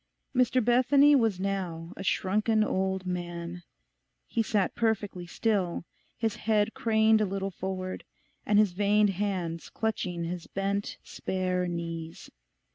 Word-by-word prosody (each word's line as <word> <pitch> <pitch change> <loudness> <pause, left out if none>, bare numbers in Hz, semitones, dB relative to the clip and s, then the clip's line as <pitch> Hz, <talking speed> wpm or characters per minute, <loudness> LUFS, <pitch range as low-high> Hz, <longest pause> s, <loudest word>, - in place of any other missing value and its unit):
Mr 255 -1 +3
Bethany 270 +4 +5
was 225 -8 +2
now 185 -3 -3
a - - -8
shrunken 215 +4 +2
old 190 -2 -1
man; 175 -1 -4 0.7
he 230 - 0
sat 210 -3 +1
perfectly 205 -6 -1
still, 185 -3 0 0.3
his 225 -3 -1
head 215 -1 +1
craned 220 -1 +3
a - - +3
little 195 0 -3
forward, 185 0 -4 0.4
and 205 - +2
his 210 -3 +5
veined 205 +2 +3
hands 180 -4 -3
clutching 180 -6 -2
his 170 0 -5
bent, 200 +1 -2
spare 185 -1 -2
knees. 165 -1 -5
195 Hz, 125 wpm, -29 LUFS, 180-220 Hz, 0.7 s, Bethany